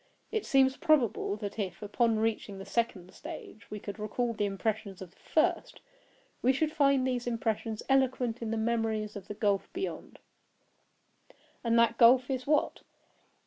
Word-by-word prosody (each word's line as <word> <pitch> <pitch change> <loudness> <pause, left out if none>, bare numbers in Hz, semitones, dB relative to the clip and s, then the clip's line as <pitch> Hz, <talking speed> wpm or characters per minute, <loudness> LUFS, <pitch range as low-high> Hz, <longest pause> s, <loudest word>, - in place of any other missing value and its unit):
It 440 -2 -2
seems 265 -2 +4
probable 275 - +2
that 210 0 -6
if, 190 0 -4
upon 225 +2 +1
reaching 215 -2 -1
the 195 - -8
second 195 -4 -2
stage, 215 - -10
we 210 - -6
could 200 +1 -7
recall 230 +3 -1
the 210 -2 0
impressions 200 -1 -3
of 185 -2 -9
the - - -28
first, 310 - 0 0.6
we 255 - +4
should 305 +4 0
find 275 -4 +3
these 250 -2 -1
impressions 225 -2 -2
eloquent 255 -3 +1
in 220 -1 -1
memories 225 -2 -1
of 200 -2 -8
the 210 - -6
gulf 205 -2 0
beyond. 375 +2 -5 1.5
And 230 -1 +2
that 230 0 +3
gulf 250 +2 +6
is—what? 270 +3 0
230 Hz, 150 wpm, -30 LUFS, 210-255 Hz, 1.5 s, gulf